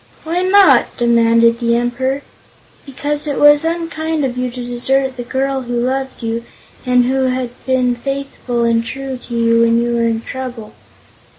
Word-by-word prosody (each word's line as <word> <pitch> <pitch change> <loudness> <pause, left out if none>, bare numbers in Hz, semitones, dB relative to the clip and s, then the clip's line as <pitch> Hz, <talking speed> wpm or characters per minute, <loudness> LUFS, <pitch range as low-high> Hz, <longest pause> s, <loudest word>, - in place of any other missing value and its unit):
"Why 335 +3 -1
not?" 385 +1 +4
demanded 230 0 +3
the 235 -1 +1
Emperor. 260 +3 -1 0.6
"Because 290 +2 -2
it 285 - -2
was 295 +1 +6
unkind 325 -2 -2
of 250 -2 -3
you 250 0 -2
to 245 0 -7
desert 260 +2 0
the 245 - -6
girl 265 +2 -2
who 245 -1 -5
loved 260 +1 -3
you, 230 +1 -2 0.4
and 250 -1 +3
who 265 +1 +1
had 255 -1 -2 0.2
been 255 -1 +2
faithful 260 -1 -3
and 230 0 +2
true 265 +3 -5
to 245 -1 -8
you 230 0 +3
when 230 0 +3
you 240 0 0
were 235 0 +1
in 225 0 -1
trouble. 245 -4 -7
250 Hz, 170 wpm, -16 LUFS, 235-275 Hz, 0.6 s, was